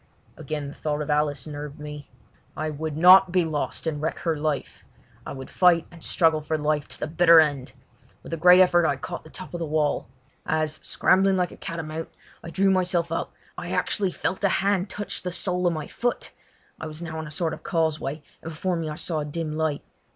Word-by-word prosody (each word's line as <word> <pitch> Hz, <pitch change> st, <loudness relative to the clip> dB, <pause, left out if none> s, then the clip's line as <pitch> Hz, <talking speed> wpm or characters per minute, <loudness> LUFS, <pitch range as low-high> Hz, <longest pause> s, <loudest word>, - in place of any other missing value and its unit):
Again 150 Hz, -1 st, -5 dB
the 140 Hz, -, -8 dB
thought 150 Hz, -1 st, -2 dB
of 150 Hz, -, -3 dB
Alice 150 Hz, -3 st, 0 dB
nerved 150 Hz, 0 st, -7 dB
me. 150 Hz, -1 st, -8 dB, 0.5 s
I 155 Hz, 0 st, -2 dB
would 155 Hz, 0 st, -4 dB
not 185 Hz, +2 st, +8 dB
be 180 Hz, -1 st, +2 dB
lost 155 Hz, 0 st, -2 dB
and 150 Hz, -3 st, -2 dB
wreck 160 Hz, -, -2 dB
her 165 Hz, -2 st, -1 dB
life: 150 Hz, -1 st, -3 dB, 0.4 s
I -, -, -5 dB
would 135 Hz, -1 st, -9 dB
fight 175 Hz, -2 st, +4 dB
and 170 Hz, -2 st, -13 dB
struggle 160 Hz, -3 st, +2 dB
for 155 Hz, +1 st, -2 dB
life 150 Hz, -1 st, 0 dB
to -, -, -11 dB
the -, -, -2 dB
bitter 165 Hz, +1 st, +6 dB
end. 145 Hz, -4 st, +1 dB, 0.5 s
With -, -, -8 dB
a -, -, -1 dB
great 180 Hz, +3 st, +7 dB
effort 175 Hz, -2 st, +5 dB
I 145 Hz, -, +1 dB
caught -, -, -7 dB
the 160 Hz, -, -14 dB
top 185 Hz, +3 st, -9 dB
of 175 Hz, -, -4 dB
the 165 Hz, -, -2 dB
wall. 150 Hz, -1 st, 0 dB, 0.4 s
As, 155 Hz, -1 st, 0 dB
scrambling 190 Hz, 0 st, +2 dB
like 180 Hz, -2 st, 0 dB
a -, -, -10 dB
catamount, 160 Hz, -1 st, -5 dB, 0.3 s
I 170 Hz, -, -7 dB
drew 195 Hz, +3 st, +2 dB
myself 180 Hz, -3 st, +1 dB
up, 165 Hz, -, -3 dB, 0.2 s
I -, -, -6 dB
actually 200 Hz, -3 st, +1 dB
felt 185 Hz, +2 st, -3 dB
a 200 Hz, -, +4 dB
hand 195 Hz, 0 st, +1 dB
touch 205 Hz, -, -3 dB
the 180 Hz, -, -4 dB
sole 180 Hz, 0 st, +1 dB
of 175 Hz, -, +2 dB
my 155 Hz, -2 st, -4 dB
foot. 245 Hz, 0 st, -3 dB, 0.5 s
I 160 Hz, -, -5 dB
was 155 Hz, +2 st, -8 dB
now 160 Hz, -1 st, -5 dB
on 160 Hz, -, -6 dB
a -, -, -8 dB
sort 160 Hz, +2 st, -1 dB
of -, -, -8 dB
causeway, 160 Hz, -3 st, -1 dB, 0.2 s
and 165 Hz, -, -7 dB
before 175 Hz, +3 st, -2 dB
me 165 Hz, -2 st, -3 dB
I 150 Hz, -, -5 dB
saw 160 Hz, 0 st, -1 dB
a 150 Hz, -, -3 dB
dim 155 Hz, +1 st, -4 dB
light. 155 Hz, -2 st, -1 dB
160 Hz, 220 wpm, -25 LUFS, 150-175 Hz, 0.5 s, not